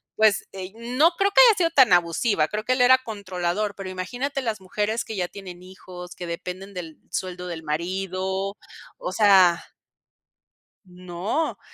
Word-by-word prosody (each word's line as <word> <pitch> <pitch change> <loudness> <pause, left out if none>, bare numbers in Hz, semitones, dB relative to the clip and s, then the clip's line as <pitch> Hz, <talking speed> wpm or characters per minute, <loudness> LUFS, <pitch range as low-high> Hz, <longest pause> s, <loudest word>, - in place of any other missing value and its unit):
pues, 215 -2 +3
eh, 190 -1 -7
no 250 +9 +2
creo 395 +3 0
que 395 - +3
haya 440 - +5
sido 335 -2 +2
tan 260 - +5
abusiva, 170 0 +2
creo 215 0 -3
que 255 - +2
él 250 - 0
era 260 +1 +7
controlador, 200 -3 -3
pero 195 -1 -7
imagínate 245 +10 -4
las 225 -5 -3
mujeres 210 +4 -2
que 220 - -6
ya 180 -3 -1
tienen 185 -3 -10
hijos, 180 -1 -11
que 180 - -7
dependen 185 +3 -6
del 165 -4 -7
sueldo 180 -1 -4
del 165 -2 -6
marido, 190 +4 -3 0.4
o 180 - -5
sea. 190 -4 +5 1.2
No, 180 - -3
190 Hz, 160 wpm, -24 LUFS, 180-225 Hz, 1.2 s, era